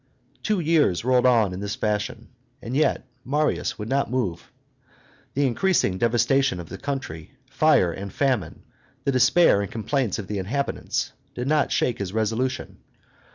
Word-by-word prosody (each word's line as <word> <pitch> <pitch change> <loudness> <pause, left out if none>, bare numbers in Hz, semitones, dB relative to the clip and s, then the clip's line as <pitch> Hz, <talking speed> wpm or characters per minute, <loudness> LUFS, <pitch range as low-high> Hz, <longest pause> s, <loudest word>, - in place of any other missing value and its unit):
Two 210 -3 0
years 155 - +2
rolled 125 0 +4
on 110 -6 +3
in 90 - -5
this 100 +2 -3
fashion; 105 -1 -2 0.3
and 120 +3 -5
yet 150 -3 +1 0.2
Marius 150 +3 0
would 105 - -5
not 135 +1 0
move. 105 -9 -3 0.8
The 140 +1 +2
increasing 130 - +1
devastation 120 0 +2
of 85 - -8
the 95 - -8
country, 95 - -5 0.2
fire, 90 - +4
and 95 +3 -7
famine, 125 - -1 0.4
the 140 - +1
despair 130 -2 +4
and 100 - -5
complaints 115 0 -1
of 105 - -5
the 105 +1 -3
inhabitants, 135 +9 -2 0.2
did 125 +1 -3
not 150 0 +2
shake 120 - 0
his 100 -1 -4
resolution. 110 +4 -2
120 Hz, 155 wpm, -24 LUFS, 100-135 Hz, 0.8 s, rolled